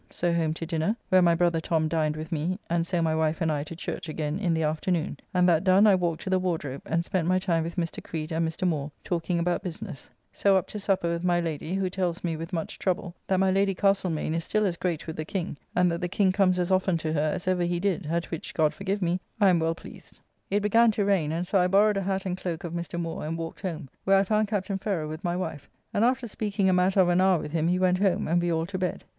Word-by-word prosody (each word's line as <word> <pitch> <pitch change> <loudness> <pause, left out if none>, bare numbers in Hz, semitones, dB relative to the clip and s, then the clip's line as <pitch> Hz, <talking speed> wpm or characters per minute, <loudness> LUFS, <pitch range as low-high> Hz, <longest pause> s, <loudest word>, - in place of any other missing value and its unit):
So 175 -1 -1
home 160 -2 0
to 165 - -5
dinner, 165 +5 0
where 185 0 +6
my 170 -1 +4
brother 170 -1 +2
Tom 160 -1 +1
dined 155 -1 0
with 155 +1 -7
me, 165 +4 -1
and 170 0 +1
so 175 -2 0
my 160 -1 +1
wife 160 +1 0
and 165 -3 +1
I 145 -1 -1
to 165 - -8
church 165 - -5
again 155 +2 -2
in 185 -5 0
the 160 - 0
afternoon, 155 0 -1
and 180 0 +3
that 165 -1 +3
done 195 +2 +5
I 210 - +7
walked 175 -3 0
to 190 - -4
the 185 - +3
Wardrobe 160 -7 -2
and 170 +1 0
spent 180 -3 -1
my 185 +1 +3
time 175 -3 +1
with 165 +1 -5
Mr. 170 -2 -3
Creed 160 0 -5
and 165 0 +1
Mr. 170 +3 -2
Moore 150 -4 -1
talking 175 0 -1
about 175 +2 0
business; 180 - -7 0.2
so 195 -1 +3
up 185 - 0
to 210 - -5
supper 195 -3 0
with 170 0 -2
my 175 -1 +2
Lady 165 0 -3
[Sandwich], 195 - -1
who 185 - 0
tells 180 -2 -2
me, 170 -2 -1
with 165 +1 -6
much 165 -2 -4
trouble, 185 -1 -1
that 190 -1 +2
my 190 0 +3
Lady 195 0 +2
Castlemaine 185 -6 +1
is 165 0 -1
still 215 +4 +1
as 180 -3 0
great 170 -2 -2
with 160 - -6
the 155 - -2
King, 170 0 -3 0.2
and 180 -1 +3
that 170 - -3
the 180 - 0
King 190 +1 +2
comes 185 -1 +3
as 180 +1 0
often 185 -2 +2
to 155 -1 -2
her 155 0 +1
as 180 - -6
ever 185 -1 +2
he 175 0 0
did, 190 -3 -1
at 170 +2 -2
which, 165 - -6
God 155 -2 +2
forgive 195 0 -2
me, 175 +1 +1 0.2
I 200 -3 +6
am 175 -2 +4
well 165 0 0
pleased. - - -13 0.3
It 205 +2 +1
began 230 +3 +5
to 205 -1 0
rain, 185 -7 +2
and 170 +2 -2
so 195 +2 +2
I 180 - +3
borrowed 200 +2 +4
a - - 0
hat 195 0 -2
and 180 -1 -1
cloak 180 -1 -4
of 170 -1 -5
Mr. 170 0 -4
Moore 165 -1 -4
and 160 +2 -3
walked 165 0 -6
home, 165 -5 -4 0.2
where 195 0 +5
I 195 - +4
found 215 +2 +1
Captain 195 -2 -2
Ferrer 185 -7 -2
with 155 +4 -7
my 175 -1 0
wife, 160 -6 -5 0.2
and 205 - +2
after 255 +1 +2
speaking 205 -2 -1
a - - +4
matter 185 +2 +4
of 180 - +3
an 175 +1 +3
hour 190 -1 +4
with 150 - -6
him 160 0 +1
he 180 +1 +2
went 185 0 +2
home 195 -2 +1
and 170 +2 +2
we 175 0 0
all 165 0 0
to 185 +1 -5
bed. 180 -1 -2
175 Hz, 280 wpm, -27 LUFS, 165-190 Hz, 0.3 s, I